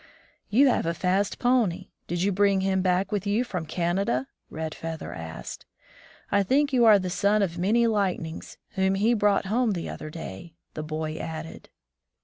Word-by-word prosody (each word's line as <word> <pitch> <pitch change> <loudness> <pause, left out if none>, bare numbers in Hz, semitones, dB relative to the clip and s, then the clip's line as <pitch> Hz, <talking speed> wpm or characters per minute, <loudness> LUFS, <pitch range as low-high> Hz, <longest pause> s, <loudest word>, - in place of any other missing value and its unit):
"You 265 +6 +5
have 235 - +1
a 165 - 0
fast 190 +3 0
pony. 245 -8 +1 0.2
Did 175 +1 -1
you 200 - +2
bring 200 0 +3
him 190 0 +1
back 185 +2 +1
with 205 -1 -2
you 210 +4 +2
from 180 -9 -5
Canada?" 170 -6 0 0.2
Red 160 0 -4
Feather 160 -1 -6
asked. 80 0 -8 0.6
"I 200 - +4
think 275 +8 +2
you 245 -2 +5
are 215 -2 +8
the 185 -2 -3
son 205 +3 +2
of 170 -2 -3
Many 220 +6 +3
Lightnings, 190 -7 -2
whom 190 -2 +1
he 215 +5 +3
brought 205 -3 +2
home 225 +2 +1
the 170 -3 -4
other 155 - -7
day," 160 - -8 0.2
the 155 - -4
boy 155 0 -4
added. 160 0 -7
190 Hz, 175 wpm, -26 LUFS, 165-210 Hz, 0.6 s, are